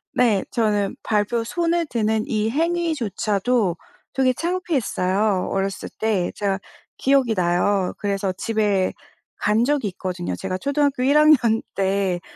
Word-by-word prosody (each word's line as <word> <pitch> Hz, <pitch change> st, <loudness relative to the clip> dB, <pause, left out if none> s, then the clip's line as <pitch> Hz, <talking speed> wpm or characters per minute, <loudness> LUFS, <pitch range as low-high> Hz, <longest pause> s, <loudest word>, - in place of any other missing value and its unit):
네. 225 Hz, -6 st, +3 dB
저는 210 Hz, -3 st, 0 dB
발표 220 Hz, +2 st, 0 dB
손을 340 Hz, +6 st, 0 dB
드는 220 Hz, -4 st, 0 dB
이 220 Hz, -5 st, 0 dB
행위조차도 245 Hz, -, 0 dB, 0.4 s
되게 260 Hz, -1 st, +3 dB
창피했어요, 220 Hz, -, 0 dB
어렸을 195 Hz, 0 st, -2 dB
때. 210 Hz, -5 st, 0 dB
제가 195 Hz, -2 st, -1 dB, 0.4 s
기억이 270 Hz, -4 st, +2 dB
나요. 180 Hz, +1 st, +1 dB
그래서 200 Hz, -1 st, -1 dB
집에 205 Hz, -1 st, 0 dB, 0.5 s
간 210 Hz, +3 st, +3 dB
적이 280 Hz, -5 st, +1 dB
있거든요. 180 Hz, -1 st, -4 dB
제가 185 Hz, -1 st, -4 dB
초등학교 280 Hz, +1 st, 0 dB
1 280 Hz, +3 st, +4 dB
학년 265 Hz, -8 st, +4 dB
때 195 Hz, -2 st, 0 dB
215 Hz, 260 characters per minute, -22 LUFS, 195-265 Hz, 0.5 s, 1